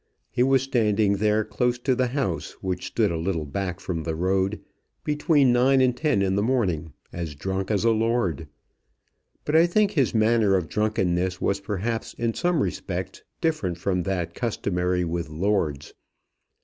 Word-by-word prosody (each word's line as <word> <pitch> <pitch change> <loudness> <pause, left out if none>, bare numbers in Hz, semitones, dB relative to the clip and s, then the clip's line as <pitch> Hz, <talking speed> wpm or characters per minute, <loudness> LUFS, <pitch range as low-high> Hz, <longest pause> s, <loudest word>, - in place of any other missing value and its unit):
He - - -1
was 135 0 +4
standing 110 -6 +2
there 105 +1 +2
close 125 0 0
to 130 +2 0
the 125 0 +1
house, 125 - -2
which 95 -1 -4
stood 105 -5 +1
a 85 - -2
little 85 -2 -2
back 90 +4 -4
from 85 -3 -3
the 80 0 -3
road, 95 +4 0 0.4
between 150 -3 +3
nine 130 +2 +4
and 130 -1 +3
ten 135 -7 +1
in 95 -1 +1
the 100 - +2
morning, 95 - 0 0.2
as 85 -4 -5
drunk 95 +5 -3
as 105 -2 +1
a 115 - +4
lord. 110 -8 0 1.0
But 150 - 0
I 165 +2 +6
think 205 +3 +2
his 135 - +1
manner 110 -2 +3
of 90 -3 0
drunkenness 95 -4 0
was 100 0 0
perhaps 105 +3 -3
in 115 -1 -1
some 175 -1 +1
respects 95 0 -4 0.2
different 155 - 0
from 90 0 -1
that 90 -2 -2
customary 90 -6 -1
with 85 -1 -3
lords. 80 -4 -1
100 Hz, 165 wpm, -25 LUFS, 90-120 Hz, 1.0 s, I